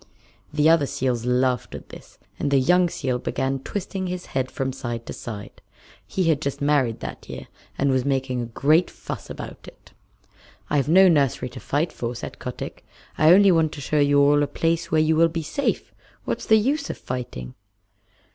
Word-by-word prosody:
The 150 Hz, +1 st, +3 dB
other 160 Hz, -3 st, +4 dB
seals 125 Hz, -3 st, -1 dB
laughed 125 Hz, -1 st, +1 dB
at -, -, -10 dB
this, -, -, -13 dB, 0.2 s
and 145 Hz, -, 0 dB
the 140 Hz, -, +3 dB
young 175 Hz, +7 st, +4 dB
seal 130 Hz, -6 st, -2 dB
began 135 Hz, +2 st, -2 dB
twisting 190 Hz, +4 st, -4 dB
his 180 Hz, 0 st, -4 dB
head 130 Hz, -1 st, 0 dB
from 135 Hz, 0 st, -3 dB
side 120 Hz, -3 st, -5 dB
to -, -, -6 dB
side. 105 Hz, -4 st, -8 dB, 0.5 s
He 190 Hz, -, -1 dB
had 160 Hz, -4 st, +2 dB
just 140 Hz, -1 st, -3 dB
married 140 Hz, -6 st, +1 dB
that -, -, -8 dB
year, -, -, -7 dB, 0.3 s
and 140 Hz, 0 st, +2 dB
was 130 Hz, -1 st, +1 dB
making 130 Hz, -2 st, -1 dB
a 120 Hz, -, -4 dB
great 155 Hz, +9 st, +2 dB
fuss -, -, -8 dB
about -, -, -8 dB
it. -, -, -15 dB, 0.8 s
"I've 145 Hz, -2 st, +1 dB
no 190 Hz, +3 st, +7 dB
nursery 140 Hz, -6 st, +2 dB
to -, -, -10 dB
fight 150 Hz, +4 st, -1 dB
for," 120 Hz, 0 st, -4 dB
said 120 Hz, -, -7 dB
Kotick. -, -, -7 dB, 0.3 s
"I 155 Hz, +1 st, +5 dB
only 195 Hz, +1 st, +7 dB
want 160 Hz, -3 st, +2 dB
to -, -, -8 dB
show 150 Hz, +2 st, 0 dB
you 145 Hz, 0 st, +4 dB
all 145 Hz, +1 st, +5 dB
a 145 Hz, -, +1 dB
place 165 Hz, +2 st, -1 dB
where 155 Hz, -, +2 dB
you 155 Hz, +1 st, +3 dB
will 165 Hz, +1 st, +4 dB
be 165 Hz, 0 st, -3 dB
safe. 155 Hz, -, -2 dB, 0.3 s
What's -, -, -3 dB
the 220 Hz, -, +6 dB
use 280 Hz, +7 st, 0 dB
of -, -, -4 dB
fighting?" 90 Hz, -, -6 dB
145 Hz, 195 wpm, -24 LUFS, 130-165 Hz, 0.8 s, no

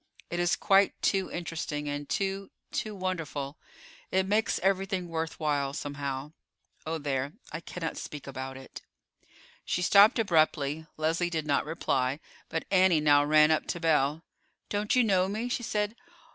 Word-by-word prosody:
It 175 Hz, -, -2 dB
is 175 Hz, -1 st, +2 dB
quite 195 Hz, 0 st, +3 dB
too 190 Hz, -2 st, +2 dB
interesting, 160 Hz, -3 st, -4 dB
and 145 Hz, 0 st, -4 dB
too—too 195 Hz, +2 st, -3 dB
wonderful. 165 Hz, -7 st, -4 dB, 0.5 s
It 190 Hz, 0 st, +2 dB
makes 210 Hz, +2 st, +1 dB
everything 190 Hz, -1 st, 0 dB
worth 160 Hz, 0 st, -3 dB
while, 145 Hz, -3 st, 0 dB
somehow. 140 Hz, -1 st, -4 dB, 0.6 s
Oh, 165 Hz, +1 st, -1 dB
there! 140 Hz, -1 st, -2 dB, 0.2 s
I -, -, -4 dB
cannot 170 Hz, -1 st, -5 dB
speak 150 Hz, -2 st, -7 dB
about 130 Hz, -1 st, -6 dB
it." 130 Hz, -, -10 dB, 0.8 s
She 180 Hz, -, -1 dB
stopped 205 Hz, +6 st, +7 dB
abruptly. 160 Hz, -6 st, +1 dB
Leslie 165 Hz, +3 st, 0 dB
did 160 Hz, -3 st, -2 dB
not 140 Hz, -2 st, +1 dB
reply; 135 Hz, -4 st, 0 dB, 0.3 s
but 165 Hz, -, -3 dB
Annie 185 Hz, -4 st, +5 dB
now 145 Hz, -1 st, +5 dB
ran 150 Hz, +1 st, +5 dB
up 155 Hz, -, +1 dB
to 175 Hz, -, -3 dB
Belle. 155 Hz, -1 st, +2 dB, 0.5 s
"Don't 210 Hz, +2 st, 0 dB
you 250 Hz, -, +5 dB
know 190 Hz, -4 st, +3 dB
me?" 215 Hz, +5 st, -2 dB
she 245 Hz, -, -1 dB
said. 210 Hz, -1 st, -1 dB
165 Hz, 150 wpm, -29 LUFS, 145-190 Hz, 0.8 s, stopped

